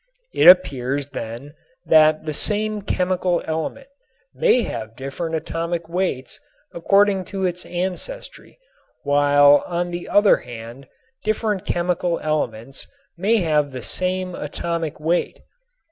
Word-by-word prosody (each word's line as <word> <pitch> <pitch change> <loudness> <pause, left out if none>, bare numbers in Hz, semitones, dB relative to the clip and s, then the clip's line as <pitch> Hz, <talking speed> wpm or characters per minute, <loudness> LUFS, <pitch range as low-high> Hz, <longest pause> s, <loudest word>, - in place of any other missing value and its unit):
It - - +4
appears 140 -6 +4
then 120 +4 -7 0.3
that 155 0 +4
the 155 - -3
same 210 +5 0
chemical 180 -2 0
element 160 - -4 0.5
may 245 - +3
have 110 - -6
different 140 +6 -4
atomic 165 +1 -3
weights 170 -7 -3 0.3
according 195 +2 +3
to 195 -1 -3
its 180 0 -3
ancestry, 190 - -6 0.5
while 145 0 +5
on 175 0 -2
the 175 0 -6
other 205 0 +5
hand 120 +2 -10 0.4
different 215 -2 -1
chemical 175 0 0
elements 135 -5 -3 0.3
may 205 +5 +2
have 150 -4 +1
the 130 -2 -7
same 185 0 -1
atomic 165 0 -4
weight. 165 +3 -1
170 Hz, 115 wpm, -21 LUFS, 145-185 Hz, 0.5 s, while